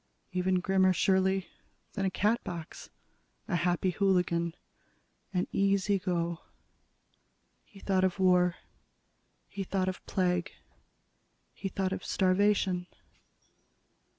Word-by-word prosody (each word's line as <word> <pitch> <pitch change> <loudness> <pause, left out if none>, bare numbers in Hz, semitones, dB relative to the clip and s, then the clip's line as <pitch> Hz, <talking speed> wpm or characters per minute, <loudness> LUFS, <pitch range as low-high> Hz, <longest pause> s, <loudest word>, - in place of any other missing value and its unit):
Even 185 0 +1
grimmer, 190 0 +3
surely, 190 +1 +2 0.5
than 195 -2 -1
a - - +2
Catbox, 185 -5 -2 0.6
a 195 - -1
Happy 175 +1 +1
Hooligan, 175 -3 +1 0.8
an 180 -2 0
Easy 195 0 +2
Go. 170 -2 -1 1.2
He 200 - -17
thought 190 -1 +1
of 185 -1 +1
war. 180 -2 +4 0.9
He 200 - -5
thought 190 0 -1
of 185 - -4
plague. 180 -2 0 1.0
He 195 - -5
thought 190 0 -1
of - - -5
starvation. 185 -1 +2
185 Hz, 100 wpm, -30 LUFS, 180-195 Hz, 1.2 s, war